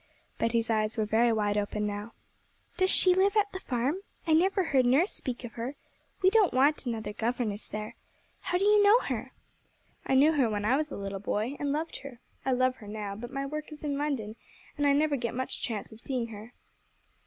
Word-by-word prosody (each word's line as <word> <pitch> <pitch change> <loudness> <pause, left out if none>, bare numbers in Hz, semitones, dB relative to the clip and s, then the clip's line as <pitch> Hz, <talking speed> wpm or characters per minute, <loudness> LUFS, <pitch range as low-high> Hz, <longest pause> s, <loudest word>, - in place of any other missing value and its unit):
Betty's 230 0 +1
eyes 215 0 0
were 215 - +1
very 230 +3 +3
wide 210 -2 +1
open 210 +1 -2
now. 205 +2 -4 0.6
'Does 375 0 +2
she 365 -1 +5
live 390 +3 +3
at 410 -1 +2
the 375 - -5
farm? 260 +2 -1 0.3
I 320 - +2
never 380 +4 +3
heard 270 -6 +3
nurse 295 - +3
speak 250 -1 -5
of 240 - -6
her. 240 +5 -5 0.5
We 375 - +6
don't 425 - +4
want 280 +1 +3
another 220 -3 -3
governess 225 -2 -2
there. 215 0 -5 0.5
How 360 - -1
do 390 - +1
you 420 0 +6
know 415 +4 +6
her?' 255 0 -4 0.8
'I 265 - +2
knew 290 +4 +6
her 265 -6 +2
when 205 -1 -2
I 245 +5 +4
was 300 +1 0
a - - -6
little 195 0 -4
boy, 215 +6 -2
and 285 -1 -1
loved 315 +3 -2
her. 270 -3 -10 0.2
I 265 - 0
love 255 0 +2
her 210 - -12
now, 205 -1 -5
but 240 +3 -7
my 275 0 -3
work 305 +2 -5
is 305 0 -10
in 290 -2 -1
London, 270 -7 -2 0.4
and 290 -1 +1
I 280 - +5
never 295 0 +2
get 235 -2 -3
much 260 +1 -4
chance 220 -4 -4
of 220 +1 -12
seeing 245 -4 -3
her.' 220 +2 -10
255 Hz, 215 wpm, -29 LUFS, 220-300 Hz, 0.8 s, We